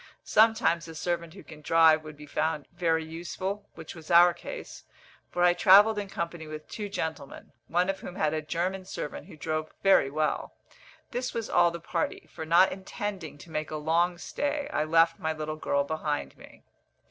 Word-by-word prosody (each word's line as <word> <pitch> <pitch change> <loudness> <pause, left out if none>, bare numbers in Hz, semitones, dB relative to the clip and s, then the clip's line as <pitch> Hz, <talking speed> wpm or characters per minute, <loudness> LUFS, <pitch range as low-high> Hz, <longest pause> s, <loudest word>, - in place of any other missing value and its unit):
Sometimes 215 -7 +3
a 165 - -9
servant 170 +1 -3
who 195 - -11
can 155 -1 -13
drive 160 0 +5
would 155 -1 -10
be 150 - -11
found 155 0 -2
very 165 -2 0
useful, 185 +5 -5
which 160 -1 -9
was 160 -1 -12
our 175 0 +7
case, - - -9 0.5
for 175 - 0
I 175 0 +6
travelled 205 +4 +6
in 200 -1 -5
company 170 -3 -5
with 155 0 -8
two 210 -2 -6
gentlemen, 160 -7 -5 0.2
one 175 +2 +1
of 195 0 -2
whom 180 - -8
had 155 -6 0
a 155 - -1
German 175 +5 -2
servant 150 - -6
who - - -13
drove 155 +1 -3
very 195 -8 +5
well. 155 +2 -2 0.6
This 250 +1 -3
was 230 -2 -3
all 170 - +5
the 170 0 -6
party; 165 0 -3
for 160 - -6
not 170 +3 +5
intending 190 -4 -5
to 160 +3 -14
make 155 -1 -3
a 155 - -5
long 165 +3 +1
stay, 290 +9 -3
I 155 - +1
left 165 +1 +3
my 160 0 -1
little 155 0 -4
girl 140 -2 0
behind 150 0 -3
me. - - -16
165 Hz, 190 wpm, -28 LUFS, 155-185 Hz, 0.6 s, our